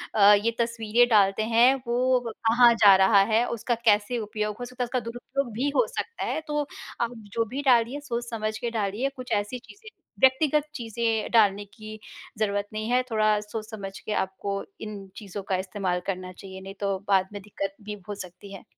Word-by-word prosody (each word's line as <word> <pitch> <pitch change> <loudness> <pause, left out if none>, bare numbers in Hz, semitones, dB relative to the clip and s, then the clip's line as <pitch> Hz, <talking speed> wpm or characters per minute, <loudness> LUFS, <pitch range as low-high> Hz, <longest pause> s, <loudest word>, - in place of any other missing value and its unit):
अ, 205 -1 +8
ये 205 +3 +2
तस्वीरें 230 0 +2
डालते 205 -2 +4
हैं, 235 +3 +5
वो 250 +2 +2
कहाँ 235 +2 +4
जा 205 -4 +7
रहा 190 +1 +5
है, 230 +2 +4
उसका 235 +1 -1
कैसे 210 +2 +3
उपयोग 210 -1 -3
हो 245 - -4
सकता 250 +1 -4
है - - 0
उसका 250 +1 -1
दुरुपयोग 240 +2 -4
भी 260 +6 0
हो - - +4
सकता 465 - -5
है, - - -1
तो 295 0 0 0.4
आप 235 0 0 0.2
जो 230 0 +1
भी 255 +6 -4
डालिए 250 +1 +3
सोच-समझ 235 -5 -3
के 240 - -3
डालिए। 220 +4 -1
कुछ 255 -2 -9
ऐसी 210 +4 -1
चीज़ें 410 - -15 0.3
व्यक्तिगत 285 +3 +4
चीज़ें 225 -3 -1
डालने 205 -3 +4
की 215 +2 -11 0.4
ज़रूरत 205 -1 0
नहीं 215 +1 -3
है, 250 +1 +4
थोड़ा 215 -1 +3
सोच-समझ 210 -2 -7
के - - -7
आपको 195 +1 -4 0.2
इन 205 -2 -7
चीज़ों 200 -2 -7
का 190 - +2
इस्तेमाल 185 -2 -2
करना 185 -1 -3
चाहिए, 190 0 -10
नहीं 195 +1 -8
तो 200 -1 0
बाद 190 -2 +3
में 205 - -6
दिक़्क़त 195 -1 -5
भी 210 -1 -6
हो 205 - -3
सकती 190 +1 -10
है। 195 - -10
215 Hz, 190 wpm, -26 LUFS, 200-240 Hz, 0.4 s, अ